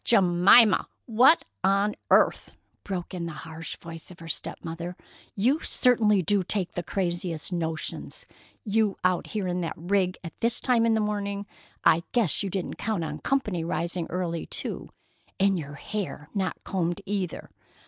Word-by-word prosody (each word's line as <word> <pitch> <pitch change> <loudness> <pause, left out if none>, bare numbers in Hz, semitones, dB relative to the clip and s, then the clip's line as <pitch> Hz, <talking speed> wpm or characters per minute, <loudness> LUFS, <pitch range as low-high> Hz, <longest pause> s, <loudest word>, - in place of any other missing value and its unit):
"Jemima, 195 +1 +6 0.2
what 250 +7 +5 0.2
on 200 +2 +3 0.2
earth!" - - +3 0.3
broke 185 -2 -4
in 170 -2 -3
the 165 - -6
harsh 160 0 -7
voice 165 -1 -10
of 180 - -12
her 165 - -10
step 165 - -3
mother. 170 +2 -5 0.4
"You 250 +10 +2
certainly 220 - +3
do 200 +4 +2
take 185 0 -1
the 175 - -3
craziest 175 -2 -2
notions! 160 -2 -3 0.4
You 215 -1 +1
out 185 -1 +1
here 205 -4 -2
in 180 0 -1
that 165 - -3
rig 185 +2 0
at 165 -3 -7
this 230 +1 0
time 235 -2 +3
in 225 - +3
the 220 - +2
morning! 205 -1 -2 0.4
I 160 - +6
guess 220 - +2
you 200 - -2
didn't 190 -1 -4
count 210 -6 -1
on 150 -1 -4
company 210 - 0
rising 170 +1 -2
early, 170 -2 -2
too. - - -2 0.5
And 195 -1 +3
your 145 -2 -7
hair 165 -3 -5
not 190 -3 -2
combed 175 0 -1
either! 195 -4 -3
185 Hz, 160 wpm, -27 LUFS, 170-210 Hz, 0.5 s, Jemima